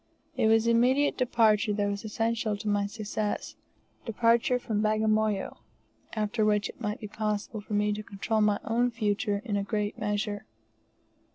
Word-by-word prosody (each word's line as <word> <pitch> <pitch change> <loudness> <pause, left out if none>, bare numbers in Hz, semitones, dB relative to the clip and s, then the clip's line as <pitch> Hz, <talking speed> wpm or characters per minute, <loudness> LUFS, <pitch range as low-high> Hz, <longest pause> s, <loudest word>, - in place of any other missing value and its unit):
It - - +2
was 225 0 +4
immediate 250 +5 +3
departure 225 -4 +3
that 205 0 0
was 200 +1 -3
essential 225 0 -1
to 205 - -7
my 205 -1 +1
success 210 0 -3 0.5
departure 230 +2 +2
from 220 -4 -2
Bagamoyo 215 -1 +1 0.6
after 215 0 0
which 210 -1 +2
it - - -12
might 210 -2 -2
be 210 - -6
possible 210 +1 -3
for 210 - -8
me 210 0 +2
to 210 - -4
control 215 +2 -2
my 210 -1 +3
own 240 +2 +1
future 210 -2 -1
in 210 -4 -1
a 200 - 0
great 210 0 -2
measure. 210 0 -2
215 Hz, 160 wpm, -28 LUFS, 205-225 Hz, 0.6 s, was